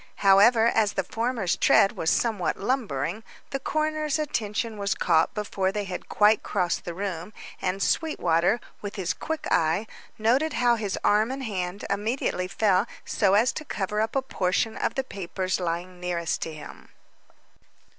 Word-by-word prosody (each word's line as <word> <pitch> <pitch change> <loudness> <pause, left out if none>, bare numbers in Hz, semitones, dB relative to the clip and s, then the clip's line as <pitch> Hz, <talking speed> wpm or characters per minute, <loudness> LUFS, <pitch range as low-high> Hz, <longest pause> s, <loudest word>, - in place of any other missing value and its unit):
However 215 +4 +6
as 220 -3 +2
the 190 - 0
former's 225 -3 -1
tread 195 - +5
was 160 - -1
somewhat 215 -4 0
lumbering, 215 - -2 0.3
the 275 - -2
coroner's 310 +1 -1
attention 225 -6 -2
was 200 -1 0
caught 160 0 +2
before 195 -2 -1
they 210 +1 -2
had 185 -2 -6
quite 210 +1 +4
crossed 180 -4 -1
the 170 - -5
room, 190 0 -4 0.3
and 190 +1 -1
Sweetwater, 180 - +1 0.2
with 205 -1 -6
his 185 -4 -1
quick 320 +9 -4
eye, 165 +6 +2 0.3
noted 260 +8 +2
how 240 -1 +3
his 210 -4 -2
arm 215 +2 +3
and 265 +1 -4
hand 190 -4 -4
immediately 205 -2 -1
fell 200 +2 +2 0.2
so 195 -2 +2
as 230 +5 +4
to - - -5
cover 210 -6 -2
up 220 +3 -2
a 270 - +1
portion 210 -1 0
of - - -2
the 270 - 0
papers 190 -4 -3
lying 175 +1 -3
nearest 175 -2 -2
to 165 - -3
him. 155 -1 -11
205 Hz, 160 wpm, -26 LUFS, 185-230 Hz, 0.3 s, However